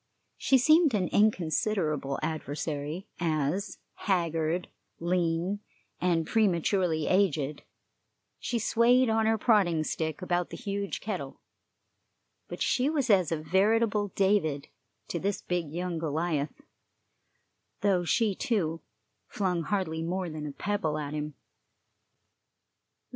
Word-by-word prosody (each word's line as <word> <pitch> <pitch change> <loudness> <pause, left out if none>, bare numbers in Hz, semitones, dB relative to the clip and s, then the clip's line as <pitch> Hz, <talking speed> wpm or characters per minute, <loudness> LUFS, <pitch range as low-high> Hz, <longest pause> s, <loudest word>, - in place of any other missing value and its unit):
She 270 - +3
seemed 310 0 +5
an 185 -3 0
inconsiderable 165 -7 +1
adversary, 155 +3 -3
as, 165 +4 -1 0.2
haggard, 170 -2 0 0.3
lean, 175 +2 0 0.4
and 170 -2 +1
prematurely 180 -5 +1
aged, 155 -7 +1 0.8
she 240 - -2
swayed 235 +2 +4
on 220 0 +2
her 225 0 +3
prodding 195 -8 +3
stick 160 +1 -3
about 175 -1 0
the - - -7
huge 200 -3 -3
kettle; 185 -10 -5 1.1
but - - -3
she 260 +3 +2
was 280 -7 +1
as 185 -5 +4
a 165 - +1
veritable 205 +6 +2
David 190 -8 +1 0.4
to 170 - -3
this 200 +3 -2
big 175 -4 -2
young 175 0 -3
Goliath, 155 -1 -2 1.2
though 195 -3 +2
she, 210 +4 +2
too, 170 -7 -1 0.5
flung 180 -4 -1
hardly 165 -3 -1
more 175 +1 -2
than 155 -1 -5
a - - -4
pebble 180 -1 -1
at 150 -1 -4
him. 150 -1 -4
180 Hz, 115 wpm, -29 LUFS, 155-205 Hz, 1.2 s, seemed